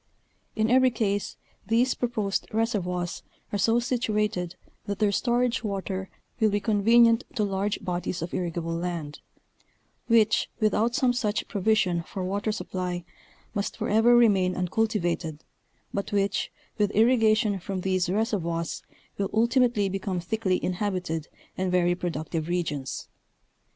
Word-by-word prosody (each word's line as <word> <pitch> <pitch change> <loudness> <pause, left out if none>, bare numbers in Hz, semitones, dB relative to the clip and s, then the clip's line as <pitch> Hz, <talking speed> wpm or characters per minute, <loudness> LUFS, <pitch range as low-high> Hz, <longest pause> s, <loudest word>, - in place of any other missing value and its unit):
In 220 0 +2
every 260 0 +6
case 205 -4 -1 0.3
these 235 +4 +3
proposed 215 -5 -1
reservoirs 180 -6 -1 0.3
are 205 - 0
so 225 +4 +3
situated, 210 -7 -1 0.3
that 200 -1 -2
their 210 -1 +2
storage 240 +3 +1
water 195 -2 -3 0.3
will 220 -2 +4
be 205 0 +1
convenient 230 +3 +4
to 215 - +1
large 200 +1 -1
bodies 180 -2 -2
of 170 - -6
irrigable 170 -2 -2
land, 165 -3 -4 0.9
which, 220 -2 +3
without 220 +2 +2
some 255 -2 +3
such 215 -4 -1
provision 195 -4 +1
for 185 +3 -6
water 200 +3 -1
supply 180 -4 -4 0.5
must 200 0 -3
forever 225 +3 +4
remain 195 -6 +4
uncultivated, 180 -5 -1 0.5
but 200 - -3
which 200 -1 0 0.3
with 205 -1 +3
irrigation 220 -3 +4
from 190 +1 -4
these 185 -1 0
reservoirs 180 -6 -1 0.4
will 195 -1 0
ultimately 235 -2 +3
become 195 -1 -2
thickly 185 0 0
inhabited 180 -4 -2 0.3
and 185 -1 0
very 175 -1 +3
pro 175 0 -2
ductive 160 0 -4
regions. 160 -6 -3
200 Hz, 130 wpm, -26 LUFS, 180-225 Hz, 0.9 s, every